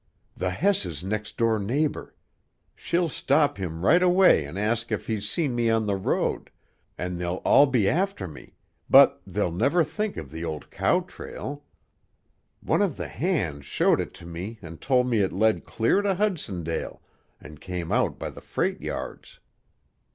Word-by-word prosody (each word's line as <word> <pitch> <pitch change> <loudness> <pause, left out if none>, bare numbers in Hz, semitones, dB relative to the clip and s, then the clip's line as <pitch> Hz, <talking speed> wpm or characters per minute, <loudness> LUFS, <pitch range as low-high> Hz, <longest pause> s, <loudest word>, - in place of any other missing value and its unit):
"The 90 +1 -1
Hess's 195 - 0
next 105 +2 -4
door 115 -2 +2
neighbor. 140 +10 -2 0.6
She'll 170 0 0
stop 145 -2 +1
him 85 -1 -4
right 175 +9 +5
away 180 - +5
an' 85 - -8
ask 115 +3 -1
if 110 - -2
he's 105 -2 -2
seen 150 -7 -1
me 120 -1 +1
on 115 -1 +2
the 100 -1 0
road, 95 - -1 0.5
an' 90 0 -4
they'll 90 +1 -2
all 145 - +6
be 120 -7 +2
after 185 - 0
me, 75 - -13 0.3
but - - +7
they'll 85 - -1
never 140 - +2
think 210 +7 -3
of 70 -4 -7
the 80 +1 -6
old 80 -3 -5
cow - - +2
trail; 145 +1 -8 1.0
one - - +1
of 190 -9 0
the - - -5
hands 95 - -2
showed - - +2
it - - -7
to 85 - -12
me 90 +7 -6
an' 80 0 -9
told 130 -2 +2
me 115 -3 +1
it 95 - +1
led 110 +3 +2
clear 115 - +1
to 200 -2 +1
Hudsondale, 105 - -2 0.4
an' 75 -1 -12
came 90 0 -5
out - - +1
by - - -5
the - - -12
freight - - -2
yards." - - -6
110 Hz, 170 wpm, -26 LUFS, 90-150 Hz, 1.0 s, but